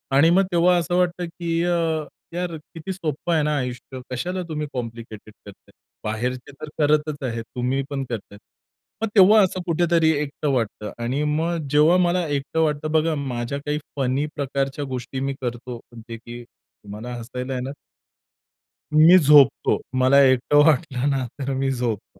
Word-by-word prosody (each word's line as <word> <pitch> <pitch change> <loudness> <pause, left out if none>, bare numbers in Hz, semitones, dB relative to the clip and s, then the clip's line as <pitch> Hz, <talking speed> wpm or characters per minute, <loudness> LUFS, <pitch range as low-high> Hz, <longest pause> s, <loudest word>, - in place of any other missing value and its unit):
आणि 150 +4 +6
मग 185 +3 +4
तेव्हा 175 +1 +4
असं 175 +1 -1
वाटतं 180 0 0
की 165 0 -3
अ, 175 0 +1 0.6
यार 175 -1 -3
किती 165 +4 -8
सोप्पं 165 -2 -3
आहे 155 -2 +2
ना 150 0 0
आयुष्य, 125 0 -5
कशाला 180 +9 -3
तुम्ही 150 -1 -3
कॉम्प्लिकेटेड 115 -3 -7
करताय. 100 - -15 0.3
बाहेरचे 125 +5 -3
तर 155 - -6
करतच 150 -1 +1
आहे, 115 0 -4
तुम्ही 125 +4 -2
पण 140 -1 -3
करताय. 105 -3 -6 0.6
मग 225 - +1
तेव्हा 210 +2 +7
असं 185 -1 -1
कुठेतरी 170 -1 +3
एकटं 145 0 -3
वाटतं 110 -4 -2
आणि 130 +5 -1
मग 160 +1 -1
जेव्हा 155 +4 +5
मला 175 -1 +1
एकटं 145 +3 -1
वाटतं 150 0 -1
बघा 160 0 +2
माझ्या 135 -1 -3
काही 150 0 -1 0.2
फनी 135 +3 0
प्रकारच्या 140 0 -2
गोष्टी 130 0 -5
मी 135 0 -2
करतो 120 0 -5 0.2
म्हणजे 115 0 -9
की 120 +1 -10
तुम्हाला 110 +1 -11
हसायला 125 +2 -5
येणार. 130 +2 -4 1.2
मी 160 +4 +8
झोपतो. 145 -4 +5 0.2
मला 130 +2 +5
एकटं 130 +2 +3
वाटलं 140 -3 +2
ना 135 -2 0
तर 135 0 -2
मी 135 0 0
झोपतो. 115 -6 -4
140 Hz, 155 wpm, -23 LUFS, 125-160 Hz, 1.2 s, मी